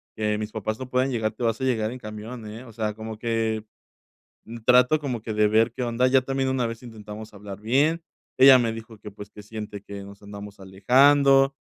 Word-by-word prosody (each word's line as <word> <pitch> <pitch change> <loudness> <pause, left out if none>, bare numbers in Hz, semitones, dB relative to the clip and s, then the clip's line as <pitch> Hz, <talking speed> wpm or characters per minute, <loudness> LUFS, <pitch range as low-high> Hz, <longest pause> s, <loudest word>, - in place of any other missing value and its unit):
que 105 -1 -1
mis 105 0 -5
papás 110 0 -4
no 130 -1 -7
puedan 130 +1 +1
llegar, 110 -3 -1
te 120 - -7
vas 115 -1 0
a - - -2
llegar 115 -4 0
en 125 - -8
camión, 110 +2 -8
¿eh?". 110 +3 -9
O 115 - -13
sea, 110 -1 -2
como 110 0 -7
que 115 -2 -1 0.8
mm, 115 +1 -9
trato, 125 +5 +5
como 130 -7 -4
que 110 - -4
de 105 0 +3
ver 110 +2 +3
qué 125 - -5
onda, 120 +2 +1
ya 130 0 +4
también 135 0 -1
una 130 -2 0
vez 115 +1 -6
intentamos 110 -2 -10
hablar 100 -1 -9
bien, 145 +9 +1 0.4
ella 130 0 +9
me 115 -2 0
dijo 115 0 -10
que, 105 +1 -10
pues, 105 0 -11
que 105 - -12
siente 105 -1 -7
que 100 -1 -8
nos 100 +1 -13
andamos 100 0 -10
alejando 135 +8 +4
110 Hz, 220 wpm, -25 LUFS, 105-125 Hz, 0.8 s, ella